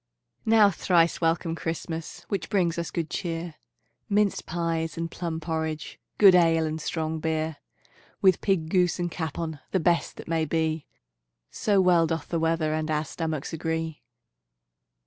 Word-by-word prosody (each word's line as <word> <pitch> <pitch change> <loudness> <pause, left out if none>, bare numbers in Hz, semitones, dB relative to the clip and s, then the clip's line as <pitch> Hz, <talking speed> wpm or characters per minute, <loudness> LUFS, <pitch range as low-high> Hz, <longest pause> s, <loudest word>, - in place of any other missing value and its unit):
Now 220 -2 +6
thrice 170 -1 +2
welcome, 165 0 +1
Christmas, 165 0 -5
Which 190 -5 -3
brings 175 -5 +1
us 170 - -3
good 165 -2 -2
cheer, 165 -1 -4 0.6
Minced 205 -1 +1
pies 165 -1 -2
and 165 0 -3
plum 165 -2 -3
porridge, 160 -1 -3 0.2
Good 195 -3 +8
ale 165 -2 +4
and 155 0 -3
strong 160 -2 -2
beer; 160 -1 -1 0.6
With 190 -2 +4
pig, 175 -6 +1
goose, 180 -1 +2
and 175 -1 -2
capon, 160 -2 -4
The 190 - +1
best 170 0 +1
that - - -9
may 165 -1 +1
be, 160 0 -1 0.6
So 205 -2 +2
well 175 -3 +4
doth 160 -2 -3
the 170 - 0
weather 160 -1 +1
And 155 0 -2
our 155 0 0
stomachs 160 -2 -4
agree. 160 -1 -3
165 Hz, 150 wpm, -26 LUFS, 160-175 Hz, 0.6 s, Good